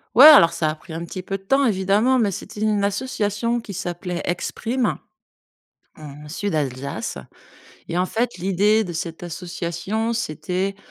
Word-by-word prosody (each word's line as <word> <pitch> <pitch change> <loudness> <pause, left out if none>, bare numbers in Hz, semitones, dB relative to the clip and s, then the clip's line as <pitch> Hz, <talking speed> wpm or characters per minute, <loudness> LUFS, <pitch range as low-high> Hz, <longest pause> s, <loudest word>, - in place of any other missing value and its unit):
Ouais, 260 +5 +10
alors, 170 - +9
ça 160 -2 0
a 155 - -3
pris 160 +1 -12
un 165 +1 -4
petit 185 +2 -7
peu 195 +1 -4
de - - -24
temps, 270 +8 +3
évidemment, 210 +4 +2
mais 215 -4 +2
c'était 200 +2 -7
une 210 -2 +1
association 215 +1 -1
qui 220 -3 -8
s'appelait 175 -1 -4
Exprime, 230 +7 -1 1.0
heu, - - -13
en 150 0 -10
Sud 200 +4 -3
Alsace. 135 -4 -3 0.7
Et 170 - -1
en 180 - +2
fait, 235 +4 -1
l'idée 200 +4 +2
de 175 - -6
cette 165 +1 -5
association, 180 +5 -3
c'était 190 0 -2
190 Hz, 165 wpm, -22 LUFS, 170-215 Hz, 1.0 s, Ouais